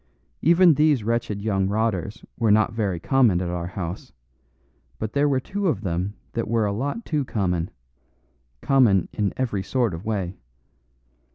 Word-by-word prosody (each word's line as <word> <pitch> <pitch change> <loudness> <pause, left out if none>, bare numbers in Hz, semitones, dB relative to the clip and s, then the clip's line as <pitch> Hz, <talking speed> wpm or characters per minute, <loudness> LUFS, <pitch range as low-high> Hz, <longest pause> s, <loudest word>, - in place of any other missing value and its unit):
Even 170 +1 +6
these 150 -4 +3
wretched 110 -3 -1
young 95 -3 +1
rotters 105 0 -2
were 115 -2 +1
not 110 +1 +3
very 100 -6 -1
common 120 -4 +3
at 90 -1 -2
our 85 -1 -3
house; 90 -1 -6 0.9
but 110 0 -4
there 145 +1 +2
were 135 -2 +2
two 200 +8 -3
of 130 - 0
them 95 +1 -2 0.2
that 115 - -2
were 115 -1 +1
a 100 - -1
lot 145 - -3
too 150 -3 0
common 90 -8 -1 0.9
common 120 - +3
in 105 -2 0
every 115 -7 -1
sort 120 +1 0
of 80 +3 -6
way. 100 -5 -3
110 Hz, 160 wpm, -24 LUFS, 95-130 Hz, 0.9 s, Even